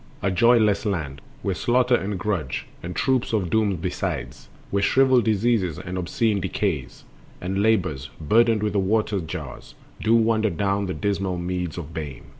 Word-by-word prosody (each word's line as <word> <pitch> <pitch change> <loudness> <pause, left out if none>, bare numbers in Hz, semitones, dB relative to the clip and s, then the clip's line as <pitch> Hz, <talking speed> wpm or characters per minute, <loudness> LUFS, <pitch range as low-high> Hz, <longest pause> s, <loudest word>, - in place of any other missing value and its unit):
A 95 - +2
joyless 110 +1 +4
land, 80 - -3 0.2
Where 100 - 0
Slaughter 125 +5 +2
and 100 -4 0
Grudge, 90 - -2 0.2
and 90 +1 -6
troops 130 -3 +1
of 95 -6 0
Dooms 105 -4 +2
besides, - - -4 0.2
Where 100 - +1
shriveled 130 +2 +4
Diseases 110 -6 +1
and 90 0 -6
obscene 100 +3 0
Decays, - - -2 0.4
And 95 +2 -2
Labors, 95 -11 +1
burdened 110 +6 +3
with 105 -2 0
the 100 - +2
water 105 +1 +1
jars, 80 -5 -7 0.3
Do 110 +1 +3
wander 110 -1 +3
down 100 +2 -1
the 95 - -3
dismal 100 -3 -1
meads 90 -1 -3
of 80 -2 -7
Bane. 75 -5 -6
100 Hz, 160 wpm, -24 LUFS, 90-110 Hz, 0.4 s, joyless